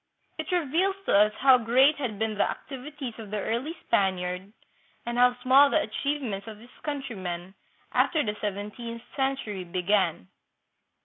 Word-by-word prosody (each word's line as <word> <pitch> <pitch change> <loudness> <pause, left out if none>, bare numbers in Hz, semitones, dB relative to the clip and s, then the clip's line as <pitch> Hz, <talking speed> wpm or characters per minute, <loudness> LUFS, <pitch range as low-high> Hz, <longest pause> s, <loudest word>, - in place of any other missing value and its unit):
It - - -4
reveals 355 +3 +1
to - - +2
us 210 +1 +6
how 260 -1 +7
great 260 +6 +4
had 245 -7 -3
been 220 +1 -1
the 205 - +1
activities 275 -2 -7
of 215 -2 -8
the 210 - -3
early 240 - -2
Spaniard 185 -2 0 0.5
and 240 0 -3
how 250 0 +5
small 275 +3 +7
the 315 - +3
achieve 285 +4 -2
ments 200 -4 -4
of 220 -1 -8
his 240 +4 -16
countrymen 190 - -5 0.4
after 310 -3 +2
the 210 0 -2
seventeenth 210 +3 -5
century 265 -8 -2
began. 180 - 0
230 Hz, 150 wpm, -27 LUFS, 200-275 Hz, 0.5 s, how